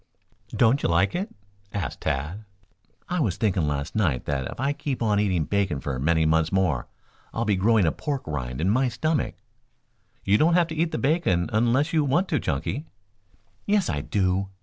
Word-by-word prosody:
"Don't 120 Hz, +4 st, +3 dB
you -, -, 0 dB
like 85 Hz, +4 st, +2 dB
it?" 190 Hz, +5 st, -2 dB, 0.5 s
asked 95 Hz, -9 st, -3 dB
Tad. 75 Hz, +10 st, -2 dB, 0.6 s
"I 180 Hz, -1 st, -1 dB
was 100 Hz, -, 0 dB
thinking 95 Hz, -7 st, +1 dB
last 70 Hz, -1 st, -3 dB
night 80 Hz, -13 st, +1 dB
that 70 Hz, -3 st, -2 dB
if -, -, -9 dB
I 140 Hz, +2 st, +1 dB
keep 145 Hz, -2 st, -4 dB
on 105 Hz, -2 st, +2 dB
eating 95 Hz, -6 st, +1 dB
bacon 100 Hz, -6 st, 0 dB
for 65 Hz, -1 st, -4 dB
many 80 Hz, +3 st, +2 dB
months 80 Hz, 0 st, +2 dB
more 90 Hz, -9 st, +1 dB, 0.5 s
I'll 115 Hz, -, 0 dB
be 105 Hz, -2 st, +2 dB
growing 105 Hz, +1 st, +3 dB
a 80 Hz, -, +3 dB
pork 140 Hz, -, -3 dB
rind 65 Hz, -5 st, -4 dB
in 90 Hz, -, +1 dB
my 130 Hz, +4 st, +2 dB
stomach." 150 Hz, +4 st, -1 dB, 0.9 s
"You 100 Hz, +2 st, +3 dB
don't 170 Hz, +2 st, +4 dB
have 175 Hz, -2 st, +3 dB
to 160 Hz, -, -5 dB
eat 160 Hz, +1 st, 0 dB
the -, -, -2 dB
bacon 135 Hz, -, +1 dB
unless 120 Hz, +8 st, +2 dB
you 155 Hz, -2 st, +3 dB
want 165 Hz, +7 st, +1 dB
to, 155 Hz, -, +1 dB
Chunky." 80 Hz, -, -3 dB, 0.8 s
"Yes, 205 Hz, -3 st, +2 dB
I -, -, -2 dB
do. 95 Hz, -1 st, 0 dB
105 Hz, 190 wpm, -25 LUFS, -, 0.9 s, don't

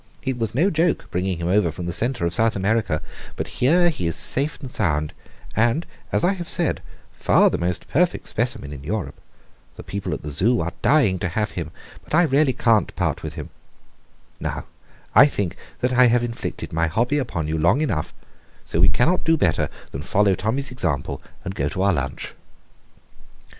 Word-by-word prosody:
It 130 Hz, -2 st, -2 dB
was 115 Hz, -1 st, -2 dB
no 175 Hz, +9 st, +3 dB
joke 165 Hz, +2 st, +1 dB
bringing 90 Hz, 0 st, -1 dB
him 85 Hz, 0 st, -3 dB
over 90 Hz, -2 st, +3 dB
from 85 Hz, +3 st, -6 dB
the 85 Hz, -, -3 dB
centre 120 Hz, -1 st, -1 dB
of 85 Hz, -, 0 dB
South 115 Hz, +1 st, +2 dB
America; 100 Hz, -5 st, 0 dB, 0.3 s
but -, -, -3 dB
here 175 Hz, +7 st, +4 dB
he 90 Hz, -, -2 dB
is 85 Hz, -, -1 dB
safe 145 Hz, +3 st, +1 dB
and 135 Hz, -, -7 dB
sound 75 Hz, -11 st, -1 dB, 0.4 s
and, 120 Hz, +9 st, +2 dB, 0.3 s
as -, -, +1 dB
I 180 Hz, +3 st, +4 dB
have 175 Hz, -3 st, -6 dB
said, 170 Hz, -4 st, 0 dB, 0.3 s
far -, -, +3 dB
the -, -, -1 dB
most 90 Hz, 0 st, -2 dB
perfect 175 Hz, +4 st, +1 dB
specimen 115 Hz, -, -2 dB
in 70 Hz, -1 st, -9 dB
Europe. 95 Hz, +5 st, -3 dB, 0.6 s
The -, -, -9 dB
people 95 Hz, -2 st, -4 dB
at -, -, -9 dB
the 75 Hz, -, -5 dB
Zoo 110 Hz, -, +2 dB
are 85 Hz, +1 st, -2 dB
dying 115 Hz, -12 st, +3 dB
to 95 Hz, -, -1 dB
have 105 Hz, +5 st, -1 dB
him, -, -, -4 dB, 0.3 s
but -, -, -2 dB
I 175 Hz, -, +6 dB
really 145 Hz, -2 st, +3 dB
can't 115 Hz, -4 st, +2 dB
part -, -, -1 dB
with -, -, -6 dB
him. -, -, -7 dB, 0.9 s
Now, -, -, -4 dB, 0.5 s
I 135 Hz, +7 st, +8 dB
think 100 Hz, -, -2 dB, 0.3 s
that 125 Hz, +1 st, +1 dB
I 125 Hz, 0 st, +6 dB
have 120 Hz, 0 st, +3 dB
inflicted 120 Hz, -7 st, -5 dB
my 85 Hz, +1 st, +2 dB
hobby 120 Hz, -, +1 dB
upon 85 Hz, -, -3 dB
you 80 Hz, +1 st, -1 dB
long 85 Hz, -, +3 dB
enough, 90 Hz, -, -1 dB, 0.5 s
so 85 Hz, -, -2 dB
we 95 Hz, +3 st, +6 dB
cannot 170 Hz, +9 st, +2 dB
do 165 Hz, 0 st, +3 dB
better 90 Hz, -, +1 dB, 0.2 s
than 70 Hz, -, -5 dB
follow 100 Hz, +5 st, +3 dB
Tommy's 115 Hz, +10 st, -2 dB
example, 85 Hz, -, -2 dB, 0.2 s
and 95 Hz, -, -4 dB
go 70 Hz, -5 st, -1 dB
to 90 Hz, -, -3 dB
our 100 Hz, -1 st, +4 dB
lunch." 70 Hz, -4 st, -3 dB
110 Hz, 195 wpm, -23 LUFS, 85-130 Hz, 0.9 s, I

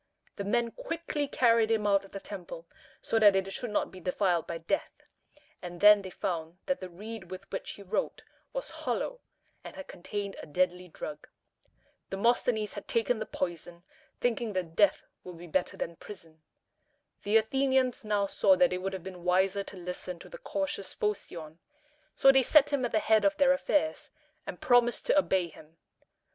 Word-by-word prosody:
The 200 Hz, -, -3 dB
men 235 Hz, +3 st, +1 dB
quickly 330 Hz, -10 st, -3 dB
carried 230 Hz, -4 st, +3 dB
him 220 Hz, -2 st, +1 dB
out 200 Hz, -1 st, +3 dB
of 195 Hz, -, -15 dB
the 195 Hz, -, -6 dB
temple, 180 Hz, -4 st, -8 dB, 0.4 s
so 225 Hz, -, +1 dB
that 205 Hz, -3 st, +7 dB
it 195 Hz, 0 st, 0 dB
should 245 Hz, -, -4 dB
not 210 Hz, -, -1 dB
be 185 Hz, -, -11 dB
defiled 180 Hz, -1 st, 0 dB
by 170 Hz, -, -3 dB
death, 165 Hz, -, -1 dB, 0.7 s
and 175 Hz, -1 st, -8 dB
then 210 Hz, +1 st, +8 dB
they 190 Hz, -, -7 dB
found 170 Hz, -2 st, -4 dB
that 275 Hz, -2 st, 0 dB
the 185 Hz, -, -7 dB
reed 205 Hz, +1 st, -9 dB
with 185 Hz, 0 st, -7 dB
which 190 Hz, -, -4 dB
he 200 Hz, -, -12 dB
wrote 200 Hz, +3 st, -2 dB, 0.3 s
was -, -, -5 dB
hollow, -, -, -3 dB, 0.4 s
and -, -, -9 dB
had 285 Hz, -, -8 dB
contained 200 Hz, +2 st, -5 dB
a -, -, -10 dB
deadly 180 Hz, +3 st, 0 dB
drug. 150 Hz, -2 st, -8 dB, 0.8 s
Demosthenes 220 Hz, +1 st, +1 dB
had 205 Hz, -, -8 dB
taken 230 Hz, 0 st, +1 dB
the 215 Hz, -, -4 dB
poison, 175 Hz, -1 st, -4 dB, 0.4 s
thinking 235 Hz, -2 st, 0 dB
that 175 Hz, -3 st, -3 dB
death 205 Hz, 0 st, +4 dB, 0.2 s
would 180 Hz, -2 st, -9 dB
be 175 Hz, -, -10 dB
better 180 Hz, +2 st, -1 dB
than 170 Hz, 0 st, -4 dB
prison. 165 Hz, -6 st, -12 dB, 0.8 s
The 210 Hz, +2 st, +3 dB
Athenians 260 Hz, +2 st, +1 dB
now 210 Hz, -2 st, +1 dB
saw 280 Hz, +7 st, +4 dB
that 270 Hz, -5 st, +3 dB
it 180 Hz, -, -2 dB
would 195 Hz, +1 st, -3 dB
have 190 Hz, -3 st, -5 dB
been 180 Hz, -2 st, -9 dB
wiser 190 Hz, +2 st, +2 dB
to 195 Hz, -, -10 dB
listen 180 Hz, 0 st, -5 dB
to -, -, -13 dB
the -, -, -10 dB
cautious 290 Hz, -, -3 dB
Phocion: 170 Hz, -6 st, -4 dB, 0.6 s
so 270 Hz, -, +7 dB
they 270 Hz, 0 st, +5 dB
set 290 Hz, +2 st, +5 dB
him 275 Hz, -2 st, +1 dB
at 240 Hz, -, -2 dB
the -, -, +2 dB
head 220 Hz, 0 st, +3 dB
of 300 Hz, 0 st, +2 dB
their 275 Hz, -2 st, +5 dB
affairs, 300 Hz, +3 st, 0 dB, 0.4 s
and -, -, -6 dB
promised 245 Hz, -1 st, +3 dB
to 295 Hz, -, +4 dB
obey 185 Hz, -10 st, +1 dB
him. 160 Hz, +1 st, -17 dB
200 Hz, 185 wpm, -30 LUFS, 180-240 Hz, 0.8 s, then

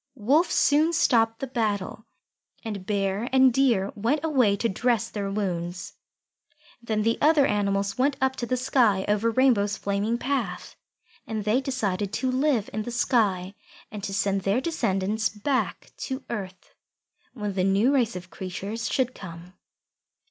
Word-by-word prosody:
Wolf 275 Hz, -, +2 dB
soon 310 Hz, +4 st, +3 dB
stopped 225 Hz, -8 st, +2 dB
the -, -, -1 dB
battle, 220 Hz, -3 st, -3 dB, 0.6 s
and 200 Hz, -4 st, -5 dB
Bear 200 Hz, +2 st, -1 dB
and 260 Hz, -1 st, +5 dB
Deer 235 Hz, -7 st, +2 dB
went 235 Hz, +9 st, -1 dB
away 255 Hz, -10 st, +3 dB
to 230 Hz, -, 0 dB
dress 230 Hz, +2 st, 0 dB
their 200 Hz, -2 st, -3 dB
wounds. 185 Hz, -3 st, -3 dB, 0.9 s
Then 220 Hz, -2 st, -1 dB
the 230 Hz, +1 st, +1 dB
other 300 Hz, -1 st, +5 dB
animals 200 Hz, -1 st, 0 dB
went 270 Hz, +1 st, +2 dB
up 265 Hz, 0 st, +1 dB
to 240 Hz, -, -3 dB
the 255 Hz, -, 0 dB
sky 230 Hz, -6 st, +2 dB
over 210 Hz, +2 st, +2 dB
Rainbow's 220 Hz, -5 st, +2 dB
flaming 200 Hz, +4 st, -1 dB
path. 270 Hz, 0 st, -3 dB, 0.5 s
And 220 Hz, -2 st, -3 dB
they 225 Hz, +5 st, +2 dB
decided 205 Hz, -8 st, -2 dB
to 255 Hz, +2 st, 0 dB
live 260 Hz, -4 st, +1 dB
in 215 Hz, -, -2 dB
the 215 Hz, -, -5 dB
sky 210 Hz, -6 st, +1 dB, 0.4 s
and 210 Hz, -2 st, -7 dB
to 200 Hz, -, -3 dB
send 195 Hz, 0 st, 0 dB
their 200 Hz, +5 st, +1 dB
descendants 220 Hz, -, -1 dB
back 255 Hz, +6 st, -2 dB
to 265 Hz, -1 st, -5 dB
earth 190 Hz, -5 st, -7 dB, 0.6 s
when 210 Hz, -4 st, -3 dB
the 185 Hz, -1 st, 0 dB
new 200 Hz, +8 st, +3 dB
race 240 Hz, -5 st, +1 dB
of 180 Hz, 0 st, -8 dB
creatures 200 Hz, +5 st, -5 dB
should 255 Hz, -2 st, 0 dB
come. 170 Hz, 0 st, -10 dB
220 Hz, 155 wpm, -25 LUFS, 200-255 Hz, 0.9 s, and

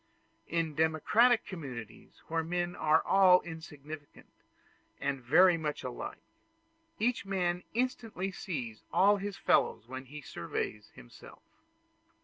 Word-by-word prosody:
In 165 Hz, -2 st, -1 dB
democratic 160 Hz, -, +3 dB
communities, 125 Hz, -, -9 dB
where 165 Hz, 0 st, 0 dB
men 175 Hz, +1 st, -2 dB
are 155 Hz, +1 st, +3 dB
all 190 Hz, -2 st, +6 dB
insignificant 155 Hz, -3 st, -10 dB, 0.7 s
and 140 Hz, -1 st, -2 dB
very 170 Hz, +8 st, +5 dB
much 150 Hz, -2 st, -3 dB
alike, -, -, -6 dB, 0.7 s
each 240 Hz, +3 st, 0 dB
man 180 Hz, -3 st, -1 dB
instantly 225 Hz, -6 st, -2 dB
sees 130 Hz, -, -5 dB
all 205 Hz, +2 st, +5 dB
his 200 Hz, 0 st, -5 dB
fellows 115 Hz, -, +2 dB
when 130 Hz, +1 st, -7 dB
he 150 Hz, +3 st, -9 dB
surveys 105 Hz, +2 st, -4 dB
himself. -, -, -14 dB
165 Hz, 115 wpm, -31 LUFS, 140-190 Hz, 0.7 s, all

